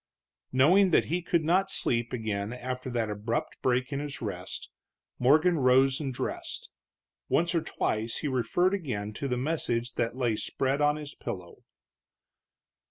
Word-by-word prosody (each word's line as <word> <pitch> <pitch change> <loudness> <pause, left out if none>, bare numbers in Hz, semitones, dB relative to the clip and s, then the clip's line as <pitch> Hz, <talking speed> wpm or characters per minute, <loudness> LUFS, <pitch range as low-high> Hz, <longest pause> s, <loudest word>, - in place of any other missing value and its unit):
Knowing 175 +10 +5
that 170 - +4
he 175 +3 -1
could 170 -1 +1
not 185 +5 +2
sleep 120 -9 +1
again 110 -3 -2
after 125 +1 -5
that 120 -2 -1
abrupt 115 +9 -3
break 130 +2 +1
in 140 - -1
his 145 -2 -5
rest, - - -5 0.5
Morgan 155 +6 +4
rose 130 +1 +4
and 140 -3 -2
dressed. 125 - -5 0.6
Once 170 +1 +2
or 165 - +2
twice 110 -5 -2
he - - -2
referred 140 - +1
again 110 - -3
to 140 - -3
the 125 -2 -1
message 125 -4 -1
that 115 +1 -1
lay 120 -4 +1
spread 135 +6 -1
on 145 0 +4
his 150 -1 -6
pillow. 90 -2 -7
130 Hz, 155 wpm, -29 LUFS, 120-155 Hz, 0.6 s, Knowing